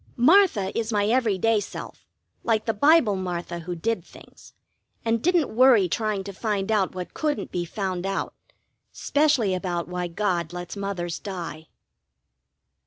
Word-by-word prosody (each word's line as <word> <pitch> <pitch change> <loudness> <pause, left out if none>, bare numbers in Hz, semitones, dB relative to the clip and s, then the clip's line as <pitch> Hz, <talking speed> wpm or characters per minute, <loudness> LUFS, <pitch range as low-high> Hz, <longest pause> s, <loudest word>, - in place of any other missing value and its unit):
Martha 255 - +4
is 230 0 -1
my 205 -2 +2
every 225 -3 +2
day 225 +3 +2
self, 205 - -8 0.4
like 220 -2 +1
the 225 - 0
Bible 285 -3 +4
Martha 175 -2 -4
who 175 +1 -5
did 225 +7 -1
things, - - -16 0.5
and 225 0 +1
didn't 340 -7 +1
worry 240 -6 +6
trying 210 +1 -1
to 200 0 -7
find 205 0 -2
out 195 -4 +1
what 180 -1 -6
couldn't 300 -2 -2
be 175 -1 -2
found 185 -1 -3
out, 195 0 -2 0.6
specially 285 -9 +2
about 180 -2 -2
why 180 0 -3
God 175 -2 -1
lets 175 +1 -6
Mothers 190 -4 -3
die. 170 -5 -6
200 Hz, 150 wpm, -25 LUFS, 180-230 Hz, 0.6 s, worry